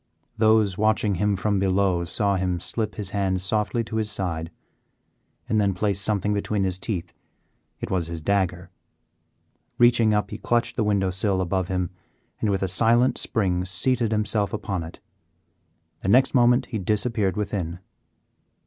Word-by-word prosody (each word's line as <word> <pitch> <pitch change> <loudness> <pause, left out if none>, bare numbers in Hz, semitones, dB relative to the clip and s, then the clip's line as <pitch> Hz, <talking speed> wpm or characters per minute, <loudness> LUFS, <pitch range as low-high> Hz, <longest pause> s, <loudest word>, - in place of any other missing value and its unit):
Those 110 -3 +3
watching 110 -1 +2
him 105 -1 +2
from 100 +1 0
be 95 - +1
low 95 -2 +1
saw 100 +4 0
him 90 -2 -1
slip 105 -1 -3
his 100 -2 -5
hand 95 -2 0
softly 105 +4 0
to 110 0 -5
his 110 -1 0
side, 85 -5 -3 1.0
and 110 -1 +2
then 100 -2 +1
place 100 0 0
something 105 0 0
between 100 0 -1
his 95 -1 -1
teeth. 90 -5 -4 0.7
It - - -5
was 90 -3 0
his 85 -1 -5
dagger. 90 0 -1 1.1
Reaching 120 -2 +5
up, 105 -1 0
he - - -6
clutched 120 0 0
the 115 - 0
window 100 -3 +1
sill 95 0 0
above 95 0 -1
him 90 -1 -2 0.5
and, 110 - 0
with 95 -1 0
a - - +1
silent 120 +6 +3
spring, 90 -5 0
seated 115 +6 +1
himself 105 -1 0
upon 100 -4 -3
it. 80 +1 -9 1.0
The - - -6
next 125 +7 +4
moment 125 0 +4
he 115 -3 -4
disappeared 105 -1 0
within. 95 -5 -3
100 Hz, 160 wpm, -24 LUFS, 95-110 Hz, 1.1 s, Reaching